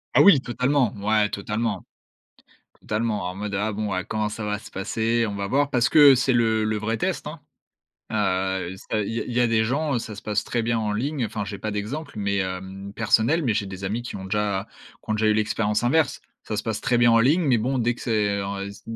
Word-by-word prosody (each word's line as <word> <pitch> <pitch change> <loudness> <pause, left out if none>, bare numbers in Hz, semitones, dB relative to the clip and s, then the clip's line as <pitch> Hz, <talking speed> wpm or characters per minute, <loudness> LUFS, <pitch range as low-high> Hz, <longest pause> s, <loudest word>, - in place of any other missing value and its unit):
Ah - - +7
oui, 185 -10 +7
totalement. 125 -1 +1
Ouais, 105 +1 +2
totalement 105 -1 -3 0.9
totalement 105 -3 -1
en 90 - -7
mode: 100 +1 -5
«Ah 105 +3 0
bon, 105 0 -3
ah 95 - -1
comment 110 +1 -2
ça 105 +1 -5
va 105 0 -1
se - - -13
passer? 115 +4 0
On 100 - -4
va 100 0 -3
voir», 140 +6 +1
parce 120 -5 +2
que 145 -1 +8
c'est 130 +1 +2
le 110 -2 +2
le 110 0 0
vrai 110 +2 -2
test - - -2
hein. - - -7 0.7
Ah, 95 -3 0 0.3
ça 110 - +1
il 100 - -3
y 115 - -1
a - - -3
il - - -6
y 120 - +1
a 120 - +4
des 115 -1 +2
gens, 140 +5 0
heu, - - +1
ça 110 -2 -6
se 105 - -9
passe 105 -1 -1
très 120 - -1
bien 115 0 0
en 105 -1 -1
ligne, 130 +4 -1
enfin, 105 -1 -3
j'ai 100 -1 -6
pas 110 - -3
d'exemple, 130 +9 -4
mais 100 0 0
hem, 95 +1 -5
personnel. 115 +8 +2
Mais 120 -7 +1
j'ai 100 - 0
des 95 0 -7
amis 110 +5 -2
qui 120 - -7
ont 95 - -7
déjà 105 0 -1 0.4
qui - - -8
ont - - +2
déjà 110 0 +1
eu 110 - +5
l'expérience 105 0 0
inverse. 145 +3 +2 0.2
Ça 105 - -4
se - - -2
passe 110 -2 -3
très 125 -3 +2
bien 120 0 +5
en 115 - +5
ligne, 150 +9 +3
mais 125 -4 +4
bon, 130 +4 -1
dès 120 0 +1
que - - -14
c'est, 105 -3 0
en 100 0 -4
heu, 100 - -4
s 100 - -12
110 Hz, 255 wpm, -24 LUFS, 100-120 Hz, 0.9 s, que